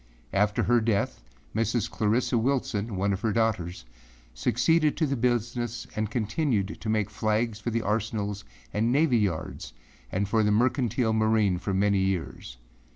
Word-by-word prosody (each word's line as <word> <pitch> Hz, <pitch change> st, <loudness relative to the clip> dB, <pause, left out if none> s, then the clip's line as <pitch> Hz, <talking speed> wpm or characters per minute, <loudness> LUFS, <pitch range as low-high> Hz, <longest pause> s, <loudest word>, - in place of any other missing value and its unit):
After 105 Hz, +1 st, +2 dB
her 120 Hz, 0 st, +3 dB
death, 110 Hz, -, 0 dB, 0.3 s
Mrs. 115 Hz, 0 st, +1 dB
Clarissa 115 Hz, +3 st, 0 dB
Wilson, 115 Hz, -4 st, 0 dB
one 100 Hz, +2 st, +1 dB
of 95 Hz, -, -4 dB
her 110 Hz, -, +1 dB
daughters, 100 Hz, -, -1 dB, 0.5 s
succeeded 150 Hz, -, +2 dB
to 160 Hz, -, +2 dB
the 140 Hz, -1 st, -1 dB
business 120 Hz, -1 st, -1 dB
and 110 Hz, -1 st, -1 dB
continued 110 Hz, -2 st, -1 dB
to 110 Hz, -, -4 dB
make 110 Hz, -1 st, 0 dB
flags 110 Hz, +1 st, 0 dB
for 115 Hz, -, -3 dB
the 115 Hz, 0 st, -1 dB
arsenals 105 Hz, -1 st, -2 dB, 0.3 s
and 115 Hz, +3 st, +1 dB
navy 140 Hz, -3 st, +3 dB
yards 85 Hz, -, -3 dB, 0.4 s
and 100 Hz, +2 st, 0 dB
for 110 Hz, +2 st, +2 dB
the 105 Hz, -, +2 dB
mercantile 120 Hz, 0 st, +2 dB
marine 110 Hz, -4 st, +2 dB
for 95 Hz, +1 st, -2 dB
many 100 Hz, 0 st, +3 dB
years. 80 Hz, -10 st, -3 dB
110 Hz, 155 wpm, -27 LUFS, 100-120 Hz, 0.5 s, her